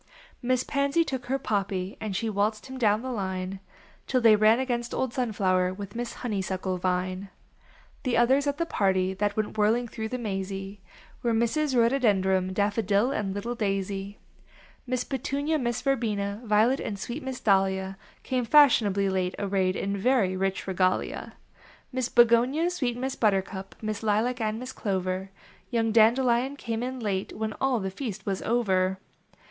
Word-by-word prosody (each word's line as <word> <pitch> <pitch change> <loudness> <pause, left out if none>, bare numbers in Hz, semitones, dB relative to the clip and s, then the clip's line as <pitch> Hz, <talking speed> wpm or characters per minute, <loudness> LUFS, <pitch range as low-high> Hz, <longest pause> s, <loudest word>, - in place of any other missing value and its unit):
Miss 255 0 +1
Pansy 280 +4 +1
took 265 -5 -5
her 265 +2 +1
Poppy 200 -6 -2
And 210 -3 -3
she 225 +4 -1
waltx.ed 210 +1 0
him 260 0 -8
down 215 -1 +2
the 260 - -3
line 190 -3 -3 0.5
Till 255 - +2
they 225 -3 +6
ran 215 +3 +5
against 240 -2 -2
old 260 -2 -1
Sunflower 190 -7 +1
With 200 0 -7
Miss 240 0 -4
Honeysuckle 190 -4 -2
Vine. 185 +1 -1 0.7
The 255 -3 0
others 265 +4 +3
at 285 0 0
the 335 - 0
party 190 - +1
that 205 +2 -1
Went 215 0 -2
whirling 225 +4 +2
through 220 -1 -5
the 255 - -3
ma/.y 195 -2 -4 0.4
Were 240 - 0
the - - +2
Misses 265 +5 +1
Rhodo 240 +3 +3
Dendron. 190 -5 +2
Daffodil 205 +3 +1
and 205 -8 -2
little 230 +4 -3
Daisy. 195 -2 -2 0.7
Miss 250 0 0
Petunia, 285 +4 -1
Miss 240 -3 -2
Verbena, 215 -6 -1
Violet, 220 +5 +3
And 205 - -4
sweet 240 +9 -5
Miss 265 -3 -5
Dahlia 190 -1 +1 0.3
Came 255 -1 -1
fashionably 220 -9 +5
late, 185 -1 -1
arrayed 190 -2 0
In 200 +1 -2
very 200 -3 +2
rich 195 0 -1
regalia. 185 -1 -1 0.6
Miss 255 -2 -1
Begonia, 245 +8 +4
sweet 250 -9 -2
Miss 265 +1 -3
Buttercup, 195 -2 -1
Miss 215 -1 -3
Lilac 225 +3 +1
and 215 0 -1
Miss 255 +2 -6
Clover; 190 -2 -2 0.4
Young 225 -2 +1
Dandelion 240 +4 +3
came 230 -5 -4
in 255 +1 -4
late 200 -4 -2
When 215 0 -2
all 265 -3 +2
the 190 -1 -3
feast 215 -1 -6
was 195 -1 -2
over. 190 -5 +1
215 Hz, 165 wpm, -27 LUFS, 195-250 Hz, 0.7 s, they